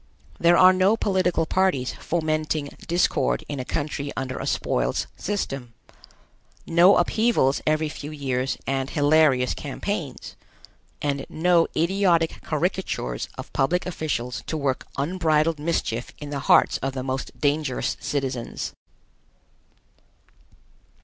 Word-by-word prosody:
There 170 +1 +5
are 185 0 +8
no 190 +4 +3
political 185 -6 +1
parties 170 -8 +1
fomenting 155 -3 -2
discord 170 -5 +1
in 145 -2 -4
a - - -2
country 145 +1 -3
under 130 -1 -3
a - - -4
spoils - - 0
system; 135 - -4 0.9
no 170 +3 +6
upheavals 175 - +2
every 155 0 +2
few 150 0 -7
years 135 -3 -2
and 135 0 -1
hilarious 145 -4 +3
campaigns; 145 0 -5 0.7
and 140 -2 -1
no 170 0 +3
idiotic 170 -1 +2
caricatures - - -2
of - - -8
public 180 +7 +1
officials 145 -8 -3
to 160 - -2
work 140 -3 -1
unbridled 160 0 +1
mischief 145 -7 -2
in 145 -1 -8
the 140 - -2
hearts - - +5
of 135 0 -2
the 130 -1 -4
most 130 0 -4
dangerous 145 -3 0
citizens. 135 -4 -3
150 Hz, 115 wpm, -24 LUFS, 135-170 Hz, 0.9 s, are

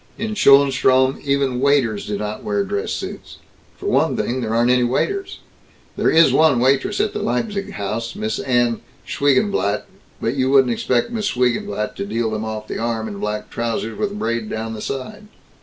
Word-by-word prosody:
In 215 +1 -3
Schoenstrom 135 -5 +4
even 140 -3 0
waiters 130 -6 +1
do 105 -1 -2
not 105 +1 -4
wear 100 -1 0
dress 100 0 -3
suits. - - -6 0.4
For - - -10
one - - +2
thing 130 +2 -1
there 110 -1 -2
aren't 120 +2 +3
any 125 0 +3
waiters. 390 - -1 0.5
There - - +2
is 165 0 +5
one 155 -6 +4
waitress 135 - +2
at 415 0 0
the 425 - -3
Leipzig 205 -4 -2
House, 110 +3 -4
Miss 110 0 -3
Annie 120 -3 +1 0.2
Schweigenblat, 140 - +1 0.4
but 115 - -1
you 130 -1 0
wouldn't 135 -3 +4
expect 125 - 0
Miss 220 -3 -2
Schweigenblat 120 -4 -1
to - - -3
deal 110 +1 -1
them 110 0 -3
off 110 -1 -5
the - - -4
arm 115 -1 -2
in 100 -2 -7
black 105 +1 -4
trousers 115 -1 -3
with 205 -1 -3
braid 115 - -2
down 110 0 -4
the 110 - -7
side. 205 +11 -6
125 Hz, 180 wpm, -20 LUFS, 110-140 Hz, 0.5 s, is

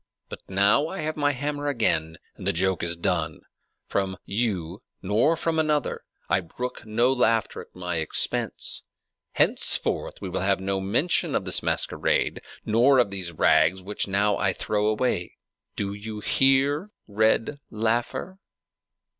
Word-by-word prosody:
But - - -7
now 100 +10 +3
I 190 0 -5
have 155 0 -2
my 145 -1 +1
hammer 145 +2 -3
again, 85 - 0 0.2
and - - -7
the - - +2
joke 95 +1 0
is 85 0 0
done. 85 -2 -1 0.4
From 95 -1 -2
you, 100 -4 -2 0.2
nor 110 - +2
from 165 0 0
another, 150 -3 0 0.2
I - - +2
brook 120 +7 -7
no 120 +4 +2
laughter 115 -4 +1
at - - -17
my 90 -2 -3
expense. 80 -1 0 0.5
Henceforth - - +1
we 100 - -6
will 90 +1 -2
have 95 0 +1
no 95 0 -1
mention 120 - +1
of - - -1
this - - +4
masquerade, - - 0 0.2
nor 125 +5 +4
of 120 -6 +3
these 95 -3 -4
rags 85 +4 +3
which 105 +2 -1
now 100 +1 +1
I 95 -2 +1
throw 105 +2 -1
away. 110 -5 -1 0.4
Do 100 -1 -3
you 105 +1 -7
hear, 135 - +2 0.2
red 110 +6 +1
laugher?" 120 - -2
105 Hz, 145 wpm, -25 LUFS, 95-135 Hz, 0.5 s, this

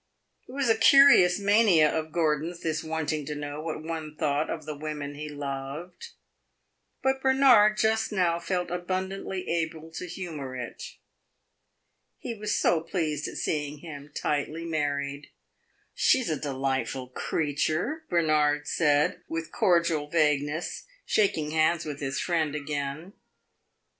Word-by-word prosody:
It - - -11
was 275 -1 0
a 225 - +6
curious 220 -8 +7
mania 200 -6 +5
of 160 0 -3
Gordon's, 160 +1 0
this 160 -1 -2
wanting 155 -1 -2
to 150 - -3
know 145 0 -5
what 155 -1 -5
one 160 -2 -5
thought 150 -1 0
of 155 -2 -4
the 155 -1 -5
women 150 -1 -5
he 150 +1 -6
loved; 145 - -6 0.9
but 265 0 +1
Bernard 265 -6 +5
just 220 +1 +1
now 175 -4 +1
felt 180 0 -2
abundantly 185 +1 -3
able 160 -1 -3
to 180 +2 -6
humor 160 -7 -6
it. 125 -2 -7 1.4
He 235 - -5
was 210 -1 -2
so 165 - +3
pleased 160 -3 -2
at - - -8
seeing 150 -1 -2
him 145 -3 -9
tightly 150 +3 -2
married. 145 -3 -2 0.7
"She 260 - +3
's - - -3
a 155 - -1
delightful 135 -2 -2
creature," 160 - -1
Bernard 150 -3 +2
said, 150 -3 +2
with 165 -1 -4
cordial 170 -4 +2
vagueness, 150 0 0 0.2
shaking 160 -8 +1
hands 160 +1 +2
with 145 -2 -5
his 135 -1 -2
friend 160 -4 0
again. 145 +4 -4
160 Hz, 135 wpm, -27 LUFS, 145-180 Hz, 1.4 s, curious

